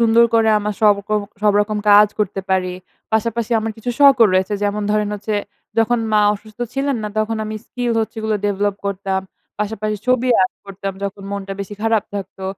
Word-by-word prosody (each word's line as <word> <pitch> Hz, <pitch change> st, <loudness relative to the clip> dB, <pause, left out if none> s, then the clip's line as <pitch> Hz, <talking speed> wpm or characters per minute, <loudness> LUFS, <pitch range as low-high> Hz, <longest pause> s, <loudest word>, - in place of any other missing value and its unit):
সুন্দর 230 Hz, 0 st, +5 dB
করে 225 Hz, -1 st, +4 dB
আমার 210 Hz, 0 st, -3 dB
সবকর 210 Hz, 0 st, +3 dB, 0.2 s
সবরকম 210 Hz, 0 st, +2 dB
কাজ 205 Hz, +1 st, +8 dB
করতে 200 Hz, -2 st, -1 dB
পারি। 185 Hz, -1 st, +1 dB, 0.4 s
পাশাপাশি 230 Hz, +1 st, 0 dB
আমার 220 Hz, 0 st, -3 dB
কিছু 225 Hz, +2 st, -4 dB
শখও 275 Hz, -5 st, +7 dB
রয়েছে। 190 Hz, +3 st, +1 dB
যেমন 205 Hz, +1 st, 0 dB
ধরেন 210 Hz, 0 st, +1 dB
হচ্ছে 210 Hz, +1 st, -3 dB, 0.4 s
যখন 235 Hz, +1 st, +3 dB
মা 210 Hz, -, +5 dB
অসুস্থ 215 Hz, +1 st, -14 dB, 0.2 s
ছিলেন 275 Hz, 0 st, 0 dB
না, 210 Hz, -, -2 dB
তখন 220 Hz, +1 st, 0 dB
আমি 215 Hz, 0 st, -5 dB
স্কিল 245 Hz, -1 st, -2 dB
হচ্ছে 220 Hz, +1 st, -4 dB
এগুলো 220 Hz, 0 st, 0 dB
ডেভেলপ 205 Hz, 0 st, 0 dB
করতাম। 195 Hz, -1 st, -1 dB, 0.4 s
পাশাপাশি 215 Hz, 0 st, -2 dB
ছবি 255 Hz, 0 st, +2 dB
আর্ট 185 Hz, -, 0 dB
করতাম 195 Hz, 0 st, -5 dB
যখন 200 Hz, 0 st, -5 dB
মনটা 200 Hz, -1 st, -4 dB
বেশি 200 Hz, +1 st, -6 dB
খারাপ 225 Hz, -2 st, +2 dB
থাকতো। 190 Hz, -1 st, -6 dB
210 Hz, 175 wpm, -19 LUFS, 200-225 Hz, 0.4 s, কাজ